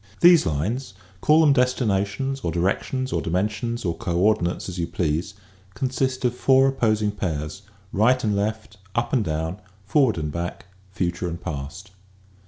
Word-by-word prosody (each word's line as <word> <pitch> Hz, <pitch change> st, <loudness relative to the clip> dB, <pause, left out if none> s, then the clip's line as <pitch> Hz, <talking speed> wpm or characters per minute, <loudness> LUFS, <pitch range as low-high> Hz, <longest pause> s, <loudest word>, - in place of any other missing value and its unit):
These 175 Hz, -2 st, +7 dB
lines 95 Hz, -, -2 dB
— 95 Hz, 0 st, -28 dB
call 155 Hz, +1 st, +5 dB
them 150 Hz, -3 st, +5 dB
destinations 125 Hz, 0 st, 0 dB
or 85 Hz, -10 st, -2 dB
di 85 Hz, -, -2 dB
rections 130 Hz, +8 st, -1 dB
or -, -, 0 dB
dimensions 105 Hz, +6 st, -2 dB
or 85 Hz, -1 st, 0 dB
coordinates 90 Hz, -2 st, 0 dB
as 90 Hz, -2 st, -5 dB
you 85 Hz, -, -1 dB
please 80 Hz, +2 st, -2 dB, 0.2 s
— 95 Hz, 0 st, -29 dB
consist 130 Hz, +1 st, -1 dB
of 120 Hz, -, +2 dB
four 135 Hz, +1 st, +4 dB
opposing 110 Hz, -5 st, +1 dB
pairs, 85 Hz, -3 st, -4 dB, 0.3 s
right 125 Hz, +6 st, +3 dB
and 105 Hz, -2 st, +1 dB
left, 110 Hz, +1 st, -3 dB, 0.2 s
up 120 Hz, 0 st, -1 dB
and 125 Hz, -5 st, +3 dB
down, 80 Hz, +4 st, -3 dB, 0.2 s
forward 120 Hz, -, +3 dB
and 75 Hz, -2 st, -2 dB
back, 85 Hz, +3 st, -5 dB, 0.2 s
future 90 Hz, -1 st, -2 dB
and 85 Hz, 0 st, -5 dB
past. 90 Hz, +4 st, -6 dB
100 Hz, 165 wpm, -24 LUFS, 85-125 Hz, 0.3 s, These